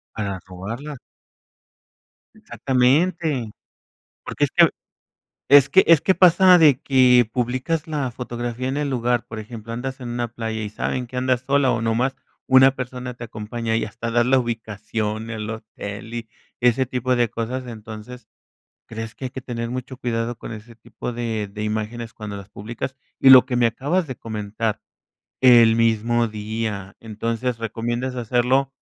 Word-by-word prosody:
Para 100 -3 -3
robarla. 115 +11 -7 1.4
Exactamente. 135 -1 +1 0.7
Porque - - 0
es - - -8
que - - +6 0.8
es 140 -1 +8
que 190 - +6
es 165 -3 +7
que 190 - +3
pasa 180 0 +6
de 145 -5 +6
que 125 -3 +4
publicas 130 +7 -1
la 145 -5 -2
fotografía 120 0 -4
en 135 +2 -2
el 145 -1 -1
lugar, 120 -1 0
por 110 -2 -7
ejemplo, 115 0 -8
andas 130 +3 -5
en 120 -1 -6
una 120 0 -2
playa, 110 -1 -4
y 105 - -4
saben 125 +3 -3
que 125 - -7
andas 130 -1 +1
sola, 140 -2 +3
o 120 -2 -1
nomás 120 +4 0 0.3
una 130 +1 +6
persona 125 -1 -6
te 120 - -9
acompaña, 115 +1 -4
y 115 - 0
hasta 115 +2 -5
das 120 +1 +3
la 135 0 +4
ubicación, 110 -1 -3
el 105 -1 -5
hotel 110 0 -7
y 115 -1 -5 0.3
ese 125 +2 +3
tipo 125 0 -1
de 120 -2 +2
cosas, 125 +3 -4
entonces, 110 +1 -9 0.6
¿crees 115 0 -6
que 130 - -8
hay - - -3
que 130 - -7
tener 115 -2 -4
mucho 130 +1 -6
cuidado 115 -1 -2
con - - -8
ese 110 +2 -11
tipo 120 +2 -7
de 115 -3 -3
de 105 +2 -6
imágenes 110 +2 -4
cuando 105 -2 -7
las 100 0 -10
publicas? 115 +6 -6 0.2
Y 135 - +6
lo 130 -1 +10
que 125 -2 -3
me 120 -1 +4
acabas 150 +9 -1
de 130 - -5
comentar, 110 0 -4 0.6
el 120 -3 +7
mismo 115 +1 +2
día, 105 -2 -5
entonces 115 +2 -3
recomiendas 120 +3 -3
hacerlo 125 +3 +1
120 Hz, 160 wpm, -22 LUFS, 110-130 Hz, 1.4 s, lo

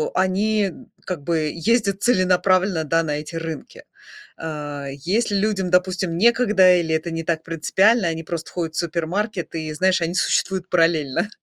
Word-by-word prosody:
э, - - +1
они 205 +3 +1
н 185 - -8 0.2
как 175 -6 -4
бы 155 -2 0
ездят 200 +2 0
целенаправленно, 185 -4 +2
да, 165 +2 +1
на 150 -2 -2
эти 155 +2 -9
рынки. 165 -2 -7 0.5
Э, 145 -3 -6 0.2
если 205 +3 +1
людям, 195 -2 0
допустим, 180 -1 +1
некогда 210 -5 +5
или 160 -1 0
это 165 +2 -3
не 165 0 -3
так 160 -1 -2
принципиально, 190 +6 +2
они 165 0 -3
просто 165 0 -6
ходят 165 -3 -4
в - - -1
супермаркет 175 +4 -3
и, 155 -1 -4
знаешь, 185 +2 +2
они 170 +2 -2
существуют 185 -1 0
параллельно. 165 +1 +1
175 Hz, 165 wpm, -22 LUFS, 160-195 Hz, 0.5 s, некогда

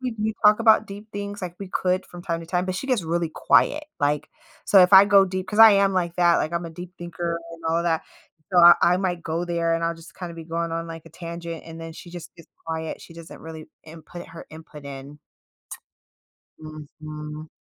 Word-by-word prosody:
we 220 -3 -2
talk 210 +1 +7
about 220 -1 +5
deep 205 +2 -10
things 205 0 -6
like 175 -1 -5
we 195 - -6
could 185 0 -1
from 175 0 -11
time 170 -3 -3
to 165 - -10
time, 180 +1 -1
but 185 - -3
she 265 - -5
gets 250 -8 +1
really 170 +1 -1
quiet. 300 - +2 0.2
Like, 145 +1 0 0.4
so 195 - +6
if 180 - +3
I 195 +1 +10
go 200 -1 +5
deep 185 0 -4
'cause 210 - -4
I 225 -1 +10
am 195 0 +3
like 175 -2 -1
that, 175 -1 +4
like, 155 - -2
I'm 170 0 -2
a 165 - -7
deep 175 +2 -10
thinker 170 0 -4
and 165 - -12
all 165 +1 +1
that. 165 -2 0 0.5
So, 180 - +4
I 175 0 +10 0.2
I - - +1
might 180 -2 -2
go 165 +2 -2
there 170 -1 0
and 165 0 -1
I'll 170 - -1
just 165 +3 -15
kinda 175 -2 -7
be 165 - -9
going 165 0 -3
on 165 0 -3
like 165 -1 -8
a - - -13
tangent 170 0 -7
and 165 0 -10
then 165 0 -8
she 170 +2 -12
just 175 0 -10
gets 165 - -17 0.2
quiet, 160 0 -4
she 165 - -14
doesn't 165 0 -11
really 160 -1 -10 0.2
input 165 +2 -11
her 165 - -11
input 155 -2 -12
in. 140 +1 -9 1.4
T - - -14 0.4
Mhm. 150 0 -8
170 Hz, 230 wpm, -24 LUFS, 165-185 Hz, 1.4 s, I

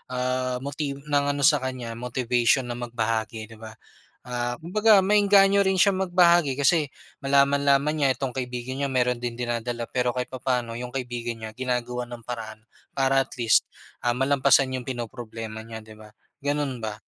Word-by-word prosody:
ah, 125 0 -1
moti 140 0 -3
ng 140 0 -1
ano 140 - -2
sa 145 0 +5
kanya 130 -3 -5
motivation 125 +1 +1
na 120 0 -6
magbahagi, 115 -2 -2
di 110 - -12
ba? 110 -1 -10 0.5
Ah, 120 0 -2
kumbaga 210 +5 +4
maeengganyo 200 0 +5
rin 190 0 +1
siyang 190 0 +3
magbahagi 175 -5 +4
kasi 150 +2 +3 0.4
malaman-laman 140 +1 +3
niya 140 -3 +2
itong 135 -2 -3
kaibigan 125 +1 -4
niya 140 - -1
mayro'n 125 -1 +2
din 120 -1 -4
dinadala 120 0 -3
pero 125 -1 0
kahit 125 -1 -2
papaano 125 -3 -2
yung 125 0 -6
kaibigan 120 -2 -4
niya 110 - -5
ginagawan 125 -1 -2
ng 120 -1 -8
paraan 110 -3 -6 0.3
para 135 0 +2
at 135 - -23
least, 115 -2 +4 0.4
ah, 120 - +2
malampasan 135 +1 +3
yung 130 - -4
pinoproblema 115 -3 -6
niya, 115 0 -8
di 110 0 -14
ba, 105 0 -15 0.3
gano'n 145 -4 -2
ba? 110 -1 -4
125 Hz, 165 wpm, -25 LUFS, 120-140 Hz, 0.5 s, sa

